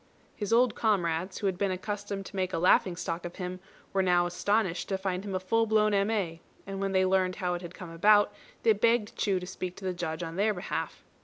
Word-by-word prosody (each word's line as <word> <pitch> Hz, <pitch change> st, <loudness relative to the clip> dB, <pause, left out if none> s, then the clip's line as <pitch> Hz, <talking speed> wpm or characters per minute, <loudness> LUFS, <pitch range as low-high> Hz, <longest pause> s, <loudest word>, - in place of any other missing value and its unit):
His 205 Hz, -1 st, -4 dB
old 240 Hz, 0 st, +4 dB
comrades, 185 Hz, -4 st, 0 dB
who 205 Hz, -, -4 dB
had 190 Hz, -2 st, 0 dB
been 200 Hz, -, +1 dB
accustomed 200 Hz, +1 st, -4 dB
to -, -, -10 dB
make 185 Hz, -1 st, -1 dB
a -, -, 0 dB
laughing 180 Hz, +1 st, +4 dB
stock 170 Hz, 0 st, -4 dB
of 175 Hz, 0 st, -7 dB
him, 185 Hz, 0 st, -5 dB, 0.3 s
were 195 Hz, -, +3 dB
now 180 Hz, -1 st, +3 dB
astonished 185 Hz, +1 st, 0 dB
to 195 Hz, -, 0 dB
find 190 Hz, -1 st, -2 dB
him 200 Hz, -2 st, -4 dB
a -, -, +1 dB
full 225 Hz, +5 st, +1 dB
blown 215 Hz, -1 st, +3 dB
M.A., 195 Hz, -5 st, 0 dB, 0.2 s
and 195 Hz, 0 st, -5 dB
when 195 Hz, 0 st, 0 dB
they 190 Hz, 0 st, +3 dB
learned 185 Hz, -1 st, +2 dB
how 180 Hz, -3 st, -1 dB
it 175 Hz, -, -3 dB
had 175 Hz, -1 st, -9 dB
come 175 Hz, -3 st, -9 dB
about, 205 Hz, +4 st, +4 dB, 0.3 s
they 225 Hz, -, +6 dB
begged 225 Hz, +1 st, +2 dB
Chu 195 Hz, -3 st, +1 dB
to 180 Hz, -, -7 dB
speak 180 Hz, -1 st, -5 dB
to 195 Hz, -, -9 dB
the 185 Hz, -, 0 dB
Judge 170 Hz, -1 st, -4 dB
on 165 Hz, +1 st, -6 dB
their 210 Hz, +1 st, +2 dB
behalf. 180 Hz, -, -4 dB
190 Hz, 235 wpm, -29 LUFS, 180-205 Hz, 0.3 s, they